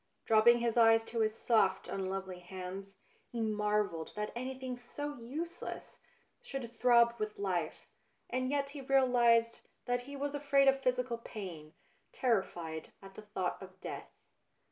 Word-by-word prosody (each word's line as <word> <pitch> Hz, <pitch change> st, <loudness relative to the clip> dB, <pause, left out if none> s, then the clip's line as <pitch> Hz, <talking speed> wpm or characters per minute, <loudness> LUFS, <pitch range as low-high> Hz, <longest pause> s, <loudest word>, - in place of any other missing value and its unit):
Dropping 225 Hz, +2 st, +6 dB
his 235 Hz, -1 st, 0 dB
eyes 225 Hz, -1 st, +6 dB
to 230 Hz, +1 st, -4 dB
his 220 Hz, -1 st, +2 dB
soft, 200 Hz, -5 st, +2 dB
un 190 Hz, -1 st, -3 dB
lovely 190 Hz, -1 st, -4 dB
hands, 190 Hz, +2 st, -7 dB, 0.3 s
he 235 Hz, -, -6 dB
marvelled 210 Hz, -6 st, 0 dB
that 210 Hz, 0 st, -3 dB
anything 255 Hz, +1 st, -4 dB
so 290 Hz, +4 st, -6 dB
useless 305 Hz, +9 st, -6 dB, 0.4 s
should 255 Hz, -4 st, -6 dB
throb 235 Hz, -1 st, +5 dB
with 215 Hz, 0 st, -3 dB
life, 185 Hz, -5 st, -2 dB, 0.4 s
and 255 Hz, 0 st, -1 dB
yet 280 Hz, 0 st, 0 dB
he 285 Hz, -1 st, -7 dB
realised 245 Hz, -4 st, +4 dB, 0.2 s
that 245 Hz, 0 st, -1 dB
he 285 Hz, -, -6 dB
was 285 Hz, +1 st, -2 dB
afraid 280 Hz, -1 st, +3 dB
of 270 Hz, 0 st, +4 dB
physical 250 Hz, -2 st, 0 dB
pain, 175 Hz, -9 st, -8 dB, 0.4 s
terrified 175 Hz, -9 st, -1 dB
at 195 Hz, 0 st, -11 dB
the 215 Hz, -, -9 dB
thought 200 Hz, -4 st, -3 dB
of 190 Hz, 0 st, -11 dB
death. -, -, -6 dB
230 Hz, 145 wpm, -33 LUFS, 195-255 Hz, 0.4 s, Dropping